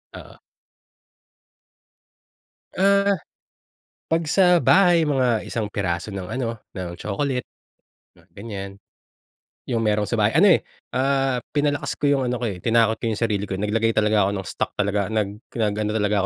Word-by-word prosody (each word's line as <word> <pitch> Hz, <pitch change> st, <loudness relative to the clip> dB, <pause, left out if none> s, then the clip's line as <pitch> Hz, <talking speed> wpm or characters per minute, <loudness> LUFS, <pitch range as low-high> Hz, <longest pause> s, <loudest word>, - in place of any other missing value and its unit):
Oo. -, -, -12 dB, 2.3 s
Ah, 200 Hz, +1 st, +3 dB, 1.0 s
pag 165 Hz, +1 st, +1 dB
sa 180 Hz, +3 st, +4 dB
bahay 175 Hz, -1 st, +4 dB
mga 130 Hz, -6 st, +1 dB
1 110 Hz, -3 st, -3 dB
piraso 95 Hz, -3 st, -3 dB
ng 95 Hz, -3 st, -6 dB
ano, 120 Hz, -3 st, -2 dB, 0.2 s
ng 90 Hz, -2 st, -6 dB
chocolate, 125 Hz, +6 st, -2 dB, 0.7 s
mga -, -, -23 dB
ganyan. 100 Hz, -2 st, -7 dB, 0.9 s
Yung 120 Hz, -3 st, -2 dB
merong 105 Hz, 0 st, +2 dB
sa 120 Hz, -, -1 dB
bahay, 105 Hz, +4 st, +2 dB
ano 195 Hz, +5 st, +6 dB
eh, -, -, +5 dB, 0.3 s
ah, 135 Hz, -1 st, +1 dB, 0.2 s
pinalakas 145 Hz, -1 st, 0 dB
ko 145 Hz, -1 st, +1 dB
yung 135 Hz, -2 st, +2 dB
ano 125 Hz, -, -1 dB
ko 125 Hz, -, -5 dB
eh, 100 Hz, -6 st, -3 dB
tinakot 115 Hz, +1 st, +2 dB
ko -, -, -2 dB
yung 110 Hz, -, -1 dB
sarili 105 Hz, -3 st, -1 dB
ko, 95 Hz, -, -3 dB
nag-lagay 110 Hz, +3 st, 0 dB
talaga 105 Hz, -2 st, +3 dB
ako -, -, -1 dB
ng 95 Hz, -3 st, -5 dB
stock -, -, -3 dB
talaga, 100 Hz, -1 st, 0 dB
nag 105 Hz, -2 st, -2 dB, 0.2 s
nag-ano 105 Hz, -1 st, -1 dB
talaga 105 Hz, -1 st, +1 dB
115 Hz, 150 wpm, -23 LUFS, 105-135 Hz, 2.3 s, ano